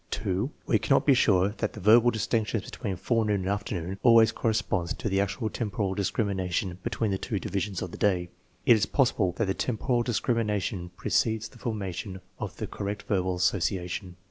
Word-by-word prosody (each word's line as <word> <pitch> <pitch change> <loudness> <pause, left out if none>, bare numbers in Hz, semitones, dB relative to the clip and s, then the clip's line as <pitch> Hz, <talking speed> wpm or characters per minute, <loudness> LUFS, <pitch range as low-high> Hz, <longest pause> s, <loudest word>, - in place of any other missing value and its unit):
(2) 95 +7 -1 0.2
We - - +2
cannot 135 - +2
be 140 - +6
sure 100 -6 +4
that 110 - -1
the - - -8
verbal 115 +5 +6
distinction 110 0 0
between 100 -2 -5
forenoon 105 +1 0
and 95 - -4
afternoon 100 -2 -3
always 115 -2 +6
cor 115 - -1
responds 95 -5 -1
to - - -4
the 95 -1 +2
actual 100 +4 -2
temporal 100 -4 -2
discrimination 95 -3 -1
between 110 -3 -1
the 95 - -1
twcujivisions 100 -3 -3
of 90 - -6
the - - -9
day. 90 -4 +1 0.4
It 120 - +7
is 105 -1 +1
possible 110 -9 +2
that 110 +5 0
lie 95 - +1
temporal 120 +3 0
discrimination 105 -6 -1
precedes 110 -1 0
the 125 - -17
'formation 100 -4 -4 0.2
of - - -5
the - - -3
correct 100 0 -5
verbal 95 -3 0
association. 90 0 -1
100 Hz, 175 wpm, -27 LUFS, 95-110 Hz, 0.4 s, It